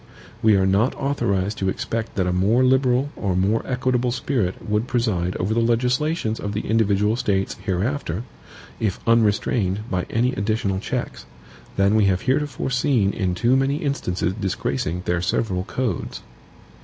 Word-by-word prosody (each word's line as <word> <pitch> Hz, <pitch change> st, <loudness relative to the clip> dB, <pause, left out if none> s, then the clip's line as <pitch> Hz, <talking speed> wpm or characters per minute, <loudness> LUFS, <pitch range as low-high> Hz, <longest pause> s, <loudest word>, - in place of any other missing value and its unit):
We 110 Hz, -2 st, +5 dB
are 95 Hz, -1 st, +3 dB
not 100 Hz, +7 st, +2 dB
authorized 105 Hz, -8 st, -1 dB
to 95 Hz, -, 0 dB
expect 115 Hz, +3 st, -3 dB
that 95 Hz, -, +1 dB
a 90 Hz, -, 0 dB
more 105 Hz, +8 st, +3 dB
liberal 130 Hz, +1 st, +3 dB
or 95 Hz, -3 st, -1 dB
more 100 Hz, +5 st, +2 dB
equitable 125 Hz, -1 st, 0 dB
spirit 120 Hz, -6 st, -2 dB
would 105 Hz, +3 st, 0 dB
preside 100 Hz, -9 st, 0 dB
over 100 Hz, +4 st, -1 dB
the 115 Hz, -, +1 dB
legislations 125 Hz, +2 st, +1 dB
of 100 Hz, -, -4 dB
the 105 Hz, -, -1 dB
individual 105 Hz, -1 st, +2 dB
States 95 Hz, -5 st, 0 dB
hereafter, 100 Hz, -, -2 dB, 0.6 s
if 105 Hz, -5 st, -1 dB
unrestrained 105 Hz, -3 st, +2 dB
by 90 Hz, -1 st, -1 dB
any 125 Hz, +3 st, +1 dB
additional 100 Hz, -3 st, -1 dB
checks, -, -, -4 dB, 0.5 s
than 100 Hz, +1 st, +3 dB
we 110 Hz, -2 st, +4 dB
have 95 Hz, -1 st, +2 dB
heretofore 135 Hz, 0 st, -1 dB
seen 125 Hz, -6 st, +2 dB
in 95 Hz, -4 st, -1 dB
too 120 Hz, +7 st, +2 dB
many 135 Hz, +1 st, +2 dB
instances 140 Hz, -, -1 dB
disgracing 90 Hz, -4 st, -2 dB
their 85 Hz, -1 st, 0 dB
several 90 Hz, 0 st, -1 dB
codes. 120 Hz, -9 st, -3 dB
110 Hz, 155 wpm, -22 LUFS, 95-125 Hz, 0.6 s, We